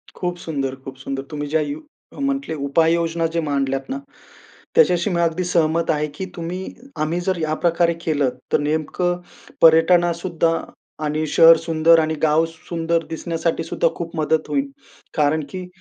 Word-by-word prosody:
खूप 175 -1 -3
सुंदर, 140 -6 -3
खूप 135 - -7
सुंदर. 135 +1 -5
तुम्ही 145 -1 -4
ज्या 155 +1 +1
यु 290 - -4 0.3
जे - - -12
म्हटले 275 -9 -1
उपाययोजना 165 +2 +2
जे - - +2
मांडल्यात 135 - -1
ना, 270 +1 -3 0.8
त्याच्याशी 180 - +4
मी 170 -2 0
अगदी 170 +2 0
सहमत 170 -2 +1
आहे 150 -1 0
की 190 - -4
तुम्ही, 170 +2 -4 0.4
आम्ही 160 +3 0
जर 185 0 -1
या 155 -1 0
प्रकारे 170 0 +3
केलं 145 -4 +2 0.2
तर - - +4
नेमकं 160 +4 -1 0.4
पर्यटनासुद्धा 170 +1 +4 0.5
आणि 155 +1 -1
शहर 165 +2 +7
सुंदर 165 0 +4
आणि 160 0 0
गाव 155 +1 +4
सुंदर 165 0 -2
दिसण्यासाठी 165 0 -2
सुद्धा 165 0 0
खूप 170 -1 -6
मदत 155 0 +1
होईल. 275 0 -1 0.5
कारण 150 +1 +2
की 185 -1 -6
165 Hz, 155 wpm, -21 LUFS, 155-175 Hz, 0.8 s, शहर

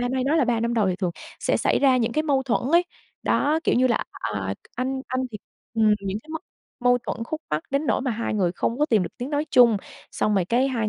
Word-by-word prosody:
hay 255 +1 0
nói 290 +4 +2
là 300 - +4
3 235 -1 +1
năm 235 +1 0
đầu 220 -4 +2
thì 180 - -1
thường 180 -2 -1 0.3
sẽ - - +1
xảy - - +2
ra 265 -2 +4
những 230 -2 0
cái 310 - +1
mâu 280 -4 +1
thuẫn 255 -3 0
ấy. 340 +1 +6 0.4
Đó, 300 +3 +2
kiểu - - +3
như 255 +1 +4
là, 235 - +1
à, 100 -3 -3 0.2
anh 260 +2 -1
anh 255 +1 -1
thì 210 - -6 0.4
ừm, 220 -2 +4
những 195 +1 -3
cái - - -24
mâu 320 - -3 0.4
mâu 245 0 +4
thuẫn 230 - -3
khúc 315 +6 -4
mắc 150 +1 0
đến 280 +3 0
nỗi - - +2
mà 260 -1 -1
hai 230 -1 -2
người 185 -5 +1
không 230 +6 -2
có 300 - +3
tìm 220 -9 +3
được 175 - -3
tiếng 250 +3 -4
nói 295 0 0
chung. 240 -4 +6 0.3
Xong 210 - 0
rồi 190 -3 +2
cái 245 +8 +2
hai 230 -5 -1
245 Hz, 265 wpm, -24 LUFS, 215-270 Hz, 0.4 s, ấy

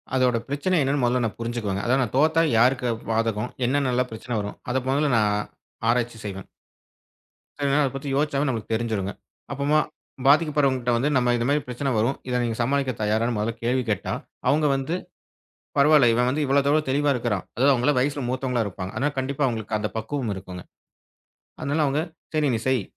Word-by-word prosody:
அதோட 125 -2 +3
பிரச்சனை 145 +7 0
என்னன்னு 135 0 0
முதல்ல 125 +1 +2
நான் 110 - -4
புரிஞ்சுக்கோங்க. 115 -4 -2
அதாவது 130 +2 +3
நான் 120 - -5
தோத்தா 160 +3 +4
யாருக்கு 125 0 +3 0.2
பாதகம்? 115 0 0 0.2
என்னன்னலாம் 125 -2 +1
பிரச்சனை 115 +2 -5
வரும்? 100 0 -6
அத 130 - +1
முதல்ல 145 +1 +2
நான் 105 -1 +2 0.6
ஆராய்ச்சி 120 -1 +1
செய்வேன். 100 -1 -6 1.1
சில 140 -1 -1
நேரம் 145 +2 +3
அத 135 - -2
பத்தி 135 +1 -5
யோசிச்சாவே 145 0 +1
நமக்குத் 115 -3 -4
தெரிஞ்சுருங்க. 110 -4 -1 0.4
அப்பம்மா 145 +2 +2 0.5
பாதிக்கப்பட்றவங்ககிட்ட 140 -4 +3
வந்து 140 +5 +1
நம்ம 125 -1 +2
இது 120 - -1
மாதிரிப் 145 -2 0
பிரச்சனை 125 +3 -2
வரும். 115 +6 +1
இத 125 0 +1
நீங்கச் 115 0 -2
சமாளிக்க 135 +2 +1
தயாரான்னு 110 +3 +1
முதல்ல 110 +2 -1
கேள்வி 125 +2 +1
கேட்டா, 105 -3 -1 0.4
அவங்க 150 +1 +3
வந்து, 135 +5 -2 0.8
பரவால்ல! 140 -3 +6
இவன் 125 +2 +2
வந்து 145 +3 0
இவ்வளவு 140 +1 +2
தூரம் 150 0 +2
தெளிவா 145 +2 +2
இருக்கிறான். 115 -6 -2
அதாவது 135 +4 +4
அவங்கள 130 +4 +2
வயசுல 140 +1 0
மூத்தவங்களா 125 -2 0
இருப்பாங்க. 95 -1 -6
அதுனால 145 +2 0
கண்டிப்பா 140 +2 -1
அவங்களுக்கு 110 -3 -3
அந்தப் 105 +1 -4
பக்குவம் 115 0 -3
இருக்கும்ங்க. 90 -1 -9 0.9
அதனால, 145 +3 -1
அவங்க 140 +2 +1 0.3
சரி 150 -2 +2
நீ - - -1
செய். 130 -6 +2
125 Hz, 170 wpm, -24 LUFS, 115-140 Hz, 1.1 s, பரவால்ல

